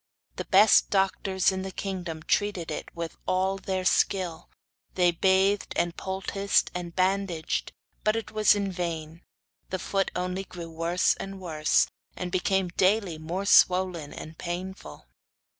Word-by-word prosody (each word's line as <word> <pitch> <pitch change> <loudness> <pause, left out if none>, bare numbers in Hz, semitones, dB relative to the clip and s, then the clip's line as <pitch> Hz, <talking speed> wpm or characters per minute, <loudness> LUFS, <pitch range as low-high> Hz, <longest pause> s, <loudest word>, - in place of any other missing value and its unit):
The - - -4
best 205 +2 +6
doctors 190 -1 +1
in 190 0 -3
the 190 - -4
kingdom 180 -5 -5
treated 195 -5 0
it - - -5
with 170 -1 -5
all 190 +1 +1
their 190 -1 -3
skill; 180 -3 +1 0.5
they 180 -1 +4
bathed, 190 +3 +2
and 170 0 0
poulticed, 195 +1 0
and 175 -1 -6
bandaged, 185 -3 0 0.3
but 215 +1 +2
it 225 - -4
was 215 -1 +4
in 200 -1 -1
vain. 165 -2 -4 0.5
The 185 - -2
foot 195 +1 -1
only 180 +1 -2
grew 170 -3 -9
worse 165 +2 +1
and 195 0 -6
worse, 155 -4 +2 0.3
and 180 -1 -5
became 190 0 +1
daily 185 -2 +1
more 175 +5 -4
swollen 180 -6 +4
and 155 +1 -9
painful. 175 - -6
185 Hz, 140 wpm, -27 LUFS, 170-195 Hz, 0.5 s, best